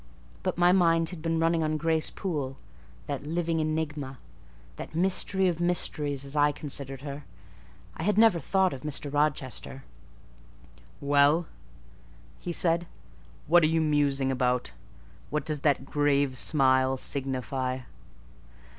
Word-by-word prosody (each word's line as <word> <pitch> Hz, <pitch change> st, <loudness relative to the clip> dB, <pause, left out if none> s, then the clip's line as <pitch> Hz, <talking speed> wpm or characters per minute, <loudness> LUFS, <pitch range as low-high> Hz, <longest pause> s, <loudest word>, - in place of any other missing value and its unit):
But -, -, -2 dB
my 175 Hz, 0 st, +5 dB
mind 165 Hz, -3 st, +3 dB
had 180 Hz, -4 st, -8 dB
been 165 Hz, 0 st, -1 dB
running 165 Hz, 0 st, +2 dB
on 155 Hz, 0 st, 0 dB
Grace 160 Hz, 0 st, 0 dB
Poole—that 140 Hz, -, -6 dB
living 165 Hz, 0 st, -1 dB
enigma, 155 Hz, -4 st, -3 dB, 0.6 s
that -, -, -8 dB
mystery 190 Hz, +2 st, +1 dB
of 170 Hz, -2 st, -1 dB
mysteries, 150 Hz, -5 st, -1 dB
as 140 Hz, +2 st, -5 dB
I 145 Hz, 0 st, +4 dB
considered 140 Hz, -2 st, -5 dB
her. 140 Hz, 0 st, -7 dB, 0.7 s
I -, -, -7 dB
had 205 Hz, +5 st, 0 dB
never 220 Hz, -6 st, +5 dB
thought 190 Hz, +1 st, +1 dB
of 130 Hz, -, -8 dB
Mr. 145 Hz, -1 st, -4 dB
Rochester. 140 Hz, -2 st, -1 dB, 1.2 s
"Well," 145 Hz, +4 st, +3 dB, 1.1 s
said 170 Hz, 0 st, +1 dB
he, 175 Hz, -, -12 dB, 0.6 s
"what 175 Hz, +3 st, +5 dB
are 155 Hz, -, +4 dB
you 160 Hz, +1 st, +1 dB
musing 145 Hz, -3 st, +1 dB
about? 125 Hz, -, 0 dB, 0.6 s
What 150 Hz, +1 st, -2 dB
does 150 Hz, -3 st, 0 dB
that 140 Hz, -3 st, +1 dB
grave 140 Hz, -2 st, +1 dB
smile 130 Hz, -1 st, +4 dB
signify?" 130 Hz, -1 st, -1 dB
150 Hz, 130 wpm, -27 LUFS, 135-165 Hz, 1.2 s, my